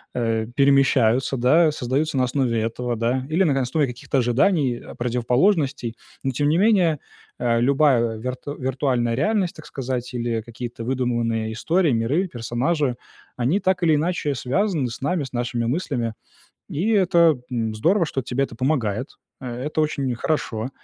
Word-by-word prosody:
э, 115 Hz, -2 st, 0 dB
перемещаются, 135 Hz, -2 st, +3 dB
да, 155 Hz, +6 st, +4 dB
создаются 140 Hz, +2 st, -1 dB
на 130 Hz, -, +3 dB
основе 125 Hz, -3 st, 0 dB
этого, 120 Hz, +2 st, -2 dB
да, 120 Hz, +3 st, -1 dB
или 165 Hz, +5 st, +2 dB
на 140 Hz, -6 st, +2 dB
основе 140 Hz, +4 st, +1 dB
каких-то 125 Hz, +3 st, -3 dB
ожиданий, 130 Hz, +1 st, +2 dB, 0.2 s
противоположностей. 125 Hz, -, +1 dB, 0.3 s
Но, 135 Hz, -, 0 dB
тем 145 Hz, +3 st, 0 dB
не 160 Hz, -, +3 dB
менее, 185 Hz, -8 st, +3 dB, 0.4 s
э, 120 Hz, -1 st, +1 dB
любая 130 Hz, -4 st, +3 dB
вирту 125 Hz, +5 st, -5 dB
виртуальная 130 Hz, -2 st, 0 dB
реальность, 195 Hz, -, 0 dB
так -, -, -11 dB
сказать, 125 Hz, -2 st, -4 dB
или 120 Hz, -2 st, -1 dB
какие-то 120 Hz, 0 st, -7 dB
выдуманные 120 Hz, -3 st, -1 dB
истории, 165 Hz, +8 st, +1 dB
миры, 130 Hz, +11 st, +1 dB
персонажи, 125 Hz, +3 st, -1 dB, 0.4 s
они 135 Hz, +12 st, +1 dB
так 185 Hz, -2 st, 0 dB
или 160 Hz, -2 st, +4 dB
иначе 155 Hz, -2 st, 0 dB
связаны 145 Hz, -, 0 dB
с 115 Hz, -, -8 dB
нами, 160 Hz, +2 st, 0 dB
с 130 Hz, -, -11 dB
нашими 120 Hz, -1 st, -1 dB
мыслями. 120 Hz, -4 st, -1 dB, 0.6 s
И 175 Hz, +9 st, -1 dB
это, 170 Hz, -, +4 dB
м, 115 Hz, -3 st, -2 dB
здорово, 170 Hz, -, +2 dB
что 135 Hz, -3 st, -3 dB
тебе 125 Hz, +3 st, -1 dB
это 125 Hz, -, -5 dB
помогает. 125 Hz, -3 st, 0 dB, 0.3 s
Э, 130 Hz, -, -9 dB, 0.2 s
это 150 Hz, +1 st, -2 dB
очень 140 Hz, -4 st, -1 dB
хорошо. 120 Hz, -4 st, -2 dB
130 Hz, 155 wpm, -23 LUFS, 120-155 Hz, 0.6 s, да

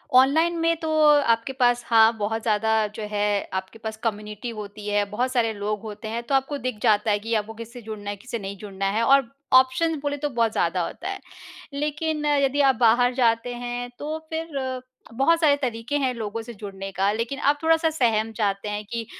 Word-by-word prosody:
Online 320 Hz, +6 st, +5 dB
में 330 Hz, 0 st, +2 dB
तो 320 Hz, -, -3 dB, 0.3 s
आपके 230 Hz, -1 st, +1 dB
पास 245 Hz, -2 st, +2 dB
हाँ, 225 Hz, -1 st, +6 dB
बहुत 220 Hz, +2 st, -2 dB
ज़्यादा 220 Hz, 0 st, +2 dB
जो 220 Hz, -, -5 dB
है 205 Hz, 0 st, 0 dB, 0.3 s
आपके 190 Hz, +4 st, -5 dB
पास 220 Hz, 0 st, -5 dB
कम्युनिटी 210 Hz, 0 st, -3 dB
होती 210 Hz, -2 st, -8 dB
है, 205 Hz, 0 st, +2 dB
बहुत 245 Hz, +5 st, -1 dB
सारे 235 Hz, -3 st, +1 dB
लोग 205 Hz, 0 st, -3 dB
होते 215 Hz, 0 st, -7 dB
हैं, 230 Hz, +2 st, -3 dB
तो 275 Hz, +3 st, 0 dB
आपको 270 Hz, +2 st, 0 dB
दिख 255 Hz, -4 st, -4 dB
जाता 215 Hz, -1 st, +3 dB
है 205 Hz, -, +2 dB
कि 225 Hz, +3 st, -4 dB
आपको 215 Hz, +1 st, -2 dB
किससे 230 Hz, +2 st, -9 dB
जुड़ना 210 Hz, -2 st, -7 dB
है, 205 Hz, -, -3 dB
किससे 235 Hz, +2 st, -6 dB
नहीं 200 Hz, 0 st, -6 dB
जुड़ना 195 Hz, -1 st, -5 dB
है 225 Hz, +3 st, +1 dB
और 270 Hz, -1 st, +4 dB, 0.2 s
ऑप्शंस 315 Hz, +6 st, +4 dB
बोले 290 Hz, 0 st, -2 dB
तो 295 Hz, +1 st, -2 dB
बहुत 230 Hz, -4 st, +1 dB
ज़्यादा 175 Hz, -1 st, 0 dB
होता 370 Hz, -, -6 dB
है। 395 Hz, -, -4 dB, 0.5 s
लेकिन 300 Hz, +1 st, -2 dB
यदि 285 Hz, -1 st, +2 dB
आप 270 Hz, -2 st, +4 dB
बाहर 245 Hz, +2 st, +4 dB
जाते 240 Hz, -1 st, +1 dB
हैं, 245 Hz, 0 st, -4 dB
तो 310 Hz, +2 st, -4 dB
फिर 275 Hz, -6 st, -3 dB, 0.3 s
बहुत 275 Hz, +7 st, +3 dB
सारे 300 Hz, -4 st, +5 dB
तरीक़े 245 Hz, +1 st, -2 dB
हैं, 260 Hz, -3 st, 0 dB
लोगों 225 Hz, -1 st, -4 dB
से 235 Hz, +1 st, -9 dB
जुड़ने 195 Hz, -2 st, -7 dB
का 195 Hz, +2 st, +1 dB
लेकिन 230 Hz, +6 st, -3 dB
आप 290 Hz, 0 st, +2 dB
थोड़ा-सा 325 Hz, 0 st, +3 dB
सहम 225 Hz, -7 st, +1 dB
चाहते 205 Hz, -1 st, -1 dB
हैं 205 Hz, 0 st, -3 dB
कि 230 Hz, +2 st, -4 dB
230 Hz, 205 wpm, -24 LUFS, 215-275 Hz, 0.5 s, हाँ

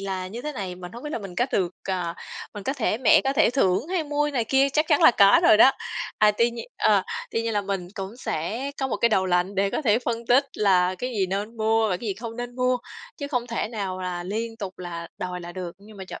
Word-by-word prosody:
là 190 Hz, -2 st, -3 dB
như 230 Hz, +6 st, -7 dB
thế 300 Hz, -, -4 dB
này, 190 Hz, -8 st, -5 dB
mình 180 Hz, 0 st, -10 dB
hông 235 Hz, -, -9 dB
biết 295 Hz, -, -4 dB
là -, -, -1 dB
mình 195 Hz, -4 st, -8 dB
có 245 Hz, -, +1 dB
được, 180 Hz, -2 st, +1 dB, 0.2 s
ờ 180 Hz, -3 st, -2 dB, 0.4 s
mình 205 Hz, -, -6 dB
có 265 Hz, -, -1 dB
thể 235 Hz, -5 st, -1 dB
mẹ 250 Hz, -, +6 dB
có 270 Hz, -, +2 dB
thể 275 Hz, -, +4 dB
thưởng 220 Hz, -, +1 dB
hay 360 Hz, -4 st, 0 dB
mua" 295 Hz, 0 st, 0 dB
này 245 Hz, -4 st, 0 dB
kia, 270 Hz, +4 st, +3 dB
chắc 305 Hz, +2 st, +2 dB
chắn 310 Hz, +1 st, +3 dB
là 320 Hz, -, +9 dB
có 200 Hz, -4 st, +6 dB
rồi 215 Hz, -, +7 dB
đó. 260 Hz, +5 st, +8 dB, 0.5 s
À, 210 Hz, -, +6 dB
tuy 235 Hz, +3 st, +2 dB
nhiên 235 Hz, 0 st, -7 dB
ờ, -, -, +4 dB, 0.3 s
tuy 230 Hz, -, -1 dB
nhiên 230 Hz, -, -2 dB
là 205 Hz, -, +1 dB
mình 195 Hz, -3 st, -4 dB
cũng 195 Hz, +3 st, -6 dB
sẽ 230 Hz, -, -3 dB
có 270 Hz, -, 0 dB
một -, -, -1 dB
cái 235 Hz, -, +3 dB
đầu 190 Hz, -4 st, +2 dB
lạnh 180 Hz, +2 st, +1 dB
để 195 Hz, 0 st, +1 dB
có -, -, -2 dB
thể 220 Hz, -4 st, +3 dB
phân 235 Hz, -1 st, -3 dB
tích 250 Hz, +4 st, +5 dB
là 185 Hz, -3 st, +3 dB
cái 250 Hz, -, -3 dB
gì 205 Hz, -6 st, 0 dB
nên 205 Hz, +5 st, -4 dB
mua 220 Hz, 0 st, +2 dB
và 180 Hz, -, 0 dB
cái 230 Hz, -, -7 dB
gì 195 Hz, -, -1 dB
không 230 Hz, +3 st, -7 dB
nên 245 Hz, 0 st, -6 dB
mua, 250 Hz, 0 st, +2 dB, 0.4 s
chứ 285 Hz, -, -5 dB
không 250 Hz, -4 st, -1 dB
thể 230 Hz, -2 st, -2 dB
nào 195 Hz, -5 st, -4 dB
là 180 Hz, -1 st, -3 dB
liên 225 Hz, +5 st, -4 dB
tục 195 Hz, -4 st, -7 dB
là 170 Hz, -2 st, -6 dB
đòi 180 Hz, -1 st, -4 dB
là 175 Hz, 0 st, -8 dB
được. 180 Hz, -2 st, -5 dB
Nhưng 210 Hz, +1 st, -15 dB
mà 190 Hz, -, -7 dB
trộm -, -, -9 dB
215 Hz, 275 wpm, -25 LUFS, 185-245 Hz, 0.5 s, là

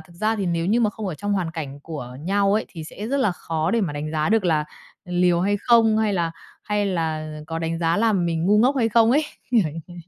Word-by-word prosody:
thực 160 Hz, +2 st, -16 dB
ra 215 Hz, +5 st, 0 dB
thì 200 Hz, -3 st, -2 dB
nếu 170 Hz, -1 st, 0 dB
như 225 Hz, +5 st, +2 dB
mà 220 Hz, -3 st, +2 dB
không 210 Hz, 0 st, -6 dB
ở 180 Hz, -, -3 dB
trong 205 Hz, +7 st, -3 dB
hoàn 185 Hz, -4 st, -1 dB
cảnh 145 Hz, -4 st, -6 dB
của 140 Hz, -5 st, -7 dB
nhau 195 Hz, +4 st, +1 dB
ấy 215 Hz, -, +1 dB
thì 160 Hz, -3 st, -8 dB
sẽ 205 Hz, +6 st, -7 dB
rất 275 Hz, -, -1 dB
là 235 Hz, -9 st, +2 dB
khó 160 Hz, -2 st, -2 dB
để 230 Hz, -, +2 dB
mà 170 Hz, -8 st, -1 dB
đánh 145 Hz, +1 st, -4 dB
giá 155 Hz, +1 st, 0 dB
được 220 Hz, -2 st, +2 dB
là 155 Hz, -4 st, +2 dB, 0.4 s
liều 180 Hz, -1 st, +2 dB
hay 205 Hz, +3 st, +1 dB
không, 225 Hz, -2 st, +4 dB
hay 215 Hz, -2 st, +1 dB
là 170 Hz, -3 st, 0 dB, 0.3 s
hay 210 Hz, -1 st, 0 dB
là 160 Hz, -4 st, -2 dB, 0.2 s
có 165 Hz, 0 st, -4 dB
đánh 165 Hz, 0 st, -2 dB
giá 165 Hz, 0 st, +1 dB
là 225 Hz, +1 st, +3 dB
mình 170 Hz, -4 st, 0 dB
ngu 210 Hz, +2 st, +4 dB
ngốc 255 Hz, +6 st, +3 dB
hay 230 Hz, -4 st, +2 dB
không 225 Hz, 0 st, +4 dB
ấy, 295 Hz, +5 st, +3 dB, 0.3 s
kiểu 240 Hz, -3 st, +5 dB
như 165 Hz, -, -7 dB
thế. 175 Hz, -, -11 dB
180 Hz, 270 wpm, -23 LUFS, 165-215 Hz, 0.4 s, kiểu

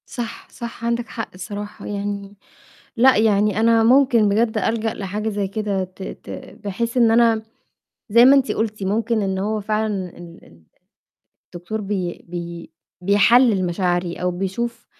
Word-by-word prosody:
صح، 235 Hz, -2 st, -6 dB
صح 235 Hz, -1 st, -7 dB
عندِك 235 Hz, 0 st, -1 dB
حق 225 Hz, -1 st, -5 dB
الصراحة. 205 Hz, +3 st, -7 dB
يعني 200 Hz, 0 st, -5 dB, 0.6 s
لأ، 255 Hz, +3 st, +6 dB
يعني 210 Hz, -1 st, +2 dB
أنا 225 Hz, 0 st, +4 dB
ممكن 240 Hz, -3 st, +4 dB
بجد 220 Hz, +2 st, +1 dB
ألجأ 220 Hz, +1 st, 0 dB
لحاجة 210 Hz, +2 st, -3 dB
زي 205 Hz, -2 st, -2 dB
كده 200 Hz, -1 st, -2 dB
ت 185 Hz, +1 st, -10 dB
ت -, -, -9 dB, 0.4 s
بحيث 230 Hz, +5 st, -2 dB
إن 235 Hz, -2 st, +5 dB
أنا 230 Hz, -1 st, +4 dB, 0.7 s
زي 235 Hz, +3 st, +7 dB
ما 270 Hz, +2 st, +8 dB
أنت 270 Hz, -1 st, +2 dB
قُلتِ 215 Hz, -2 st, -2 dB
ممكن 220 Hz, +3 st, 0 dB
إن 190 Hz, -1 st, -1 dB
هو 210 Hz, +2 st, -1 dB
فعلًا 210 Hz, -3 st, -2 dB
ال 170 Hz, -1 st, -13 dB
ال 85 Hz, 0 st, -20 dB, 0.9 s
الدكتور 175 Hz, +5 st, -5 dB
بي 190 Hz, -4 st, -4 dB
بي 170 Hz, -1 st, -7 dB, 0.3 s
بيحلِّل 205 Hz, +1 st, +4 dB
مشاعري 175 Hz, -1 st, -1 dB
أو 180 Hz, -, -1 dB
بيشوف 230 Hz, +6 st, -4 dB
210 Hz, 150 wpm, -21 LUFS, 190-230 Hz, 0.9 s, ما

